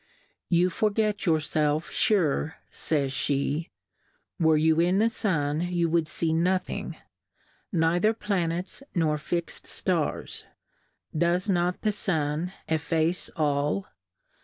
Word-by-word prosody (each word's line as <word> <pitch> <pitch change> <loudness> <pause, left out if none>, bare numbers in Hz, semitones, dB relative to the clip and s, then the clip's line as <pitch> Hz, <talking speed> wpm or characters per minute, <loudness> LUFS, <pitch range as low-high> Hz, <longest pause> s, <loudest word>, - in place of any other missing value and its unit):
You 180 +1 +3
forget 215 +1 0
your 160 -2 +5
felf 155 0 0
fure,/^jj^^, 150 -4 0 0.7
were. 160 -2 +4
you 160 +1 +3
in 175 +3 +3
the 220 +3 +4
Sun 160 -9 0
you 175 -1 0
wouM 165 -2 +2
fee 160 +1 0
nothing, 180 +3 -1 0.7
neither 175 +3 +3
Planets 180 -3 -2
nor 155 -3 +1
fix'd 170 +2 -4
Stars; - - -2 0.7
does 175 +4 +2
not 180 0 0
the 215 - +3
Sun 160 -4 -1 0.2
efface 160 +2 0
all 150 +5 0
170 Hz, 105 wpm, -27 LUFS, 155-185 Hz, 0.7 s, your